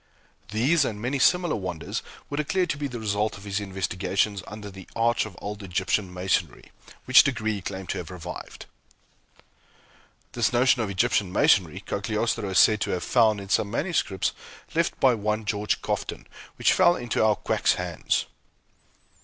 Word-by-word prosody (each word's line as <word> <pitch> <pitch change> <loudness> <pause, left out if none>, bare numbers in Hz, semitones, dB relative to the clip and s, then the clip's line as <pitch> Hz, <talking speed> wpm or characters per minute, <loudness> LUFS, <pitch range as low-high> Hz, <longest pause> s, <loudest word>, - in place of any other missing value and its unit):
These 135 +9 +2
and 110 -5 -3
many 130 +5 -2
similar 175 +4 +3
wonders 90 -5 -4 0.3
were 145 - -5
declared 175 +5 0
to - - -4
be 145 - -1
the 125 -3 -6
result 105 -1 -1
of 100 - -13
his 100 0 -2
investigations 95 +1 -1
under 105 -1 -8
the 95 -1 -12
Arch 115 -1 +1
of 95 - -13
Old 105 +1 -6
Egyptian 95 +1 -1
Masonry, 90 -2 -2 0.3
which 130 - +8
degree 115 -6 -1
he 100 - -5
claimed 95 -1 -6
to - - -2
have 90 - -7
revived. 90 -1 -8 1.7
This 120 -2 +1
notion 125 0 +3
of 110 - -2
Egyptian 100 -1 +1
Masonry, 95 -2 +3
Cagliostro 105 +1 -2
is 95 - 0
said 105 -1 +5
to - - -1
have 90 - -2
found 110 -4 +3
in 100 -1 -9
some 100 - +2
manuscripts 115 - -1 0.4
left 170 +1 0
by 130 -2 +5
one 105 0 -2
George 105 0 -1
Cofton, - - -3 0.3
which - - +3
fell 175 - +5
into 120 -5 -1
our 110 -1 +4
quack's - - +1
hands. - - -1
105 Hz, 165 wpm, -25 LUFS, 95-120 Hz, 1.7 s, which